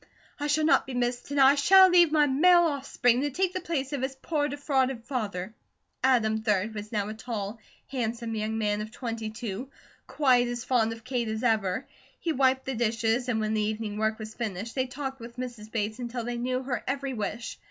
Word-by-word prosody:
I 290 - -1
shall 305 +1 +2
not 315 - +4
be 260 - -5
missed, 245 +1 -1
and 285 0 -1
I 270 +1 +8
shall 375 +7 +7
leave 350 -3 +6
my 305 -1 +4
male 345 +6 +5
offspring 270 -5 +1
to 290 - 0
take 365 +6 0
the 370 - -3
place 300 -5 -3
of 280 - -2
his 265 +1 -2
poor, 290 +2 -1
defrauded 270 -4 0
father." 210 -7 -3 0.5
Adam, 220 -4 +3
3d, 210 0 0
was 210 0 -7
now 205 -3 -1
a - - -4
tall, 220 -1 -5 0.3
handsome 235 -3 -3
young 220 0 -2
man 210 -1 0
of 215 - -5
twenty 225 -1 -5
two, 220 +3 -6 0.4
quite 250 -4 +3
as 240 0 -4
fond 230 -4 +2
of 225 0 -8
Kate 245 -1 -2
as 220 +1 -3
ever. 220 -1 +1 0.3
He 335 - -1
wiped 260 -1 +2
the 265 - -2
dishes, 230 +1 0
and 225 -3 +1
when 215 0 -1
the 215 - +1
evening 215 0 -2
work 220 0 +1
was 220 0 -8
finished, 220 -1 -4
they 260 -1 0
talked 270 +1 -5
with 235 +1 -10
Mrs. 240 -4 -7
Bates 215 +1 -2
until 240 0 -4
they 240 +1 -3
knew 255 +1 -1
her 250 -4 -3
every 275 0 -2
wish. 215 +1 -4
245 Hz, 210 wpm, -28 LUFS, 220-270 Hz, 0.5 s, I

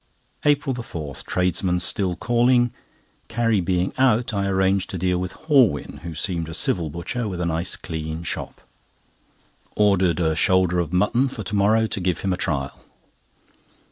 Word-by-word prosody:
APRIL 145 -2 +2
4. 80 - -6
Tradesmen 90 0 0
still 90 0 0
calling; 120 +4 +2 0.6
Carrie 115 -3 +1
being 90 +1 0
out, 125 -3 +3
I 100 -1 0
arranged 95 0 +1
to 95 - -4
deal 90 0 0
with 90 0 -4
Horwin, 130 - +3
who 85 -1 -7
seemed 85 0 -2
a 80 - -4
civil 85 -3 0
butcher 105 +10 -4
with 90 -4 -4
a 90 - -1
nice 85 +2 -1
clean 80 -1 -5
shop. - - -5 1.1
Ordered 95 -4 +3
a 80 -2 +1
shoulder 90 0 +2
of 85 -2 -2
mutton 105 +8 +2
for 120 -5 -6
to 100 - -6
morrow, 110 +3 +3
to 110 - -3
give 90 -2 -1
him 95 -2 0
a - - -3
trial. 70 -6 -3
95 Hz, 160 wpm, -23 LUFS, 85-110 Hz, 1.1 s, out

